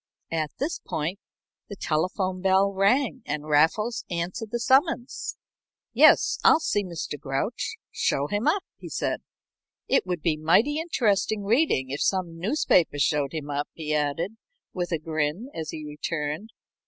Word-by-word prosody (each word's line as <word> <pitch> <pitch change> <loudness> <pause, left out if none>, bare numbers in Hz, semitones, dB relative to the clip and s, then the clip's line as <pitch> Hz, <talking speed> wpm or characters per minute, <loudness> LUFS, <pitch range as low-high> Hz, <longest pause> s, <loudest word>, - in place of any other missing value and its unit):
At 160 -2 -1
this 295 +5 -2
point 165 +6 -3 0.5
the 200 - -6
telephone 185 +3 -1
bell 195 +1 +3
rang 250 +7 +2
and 150 +1 -3
Raffles 160 +10 +2
answered 175 +5 -3
the 235 - -1
summons. 265 +1 +1 0.6
"Yes, - - +5
I'll - - +7
see 205 -9 0
Mr. 170 -5 -5
Grouch. 160 - -2 0.2
Show 140 - 0
him 205 - -1
up," 370 +5 +2 0.2
he - - -8
said. - - -2 0.7
"It 270 - +2
would 175 -3 -3
be 160 -3 +1
mighty 210 - +3
interesting 220 - +1
reading 205 - +2
if 140 - -3
some 175 -4 0
newspaper 180 - +2
showed 140 0 +1
him 150 -2 -5
up," 145 +1 -2
he 155 -2 -3
added, 155 +8 -1 0.4
with 175 -1 -3
a 165 - +1
grin, 155 - -2
as 160 -1 -5
he 155 -1 -6
returned. 150 +5 -4
180 Hz, 150 wpm, -26 LUFS, 150-220 Hz, 0.7 s, I'll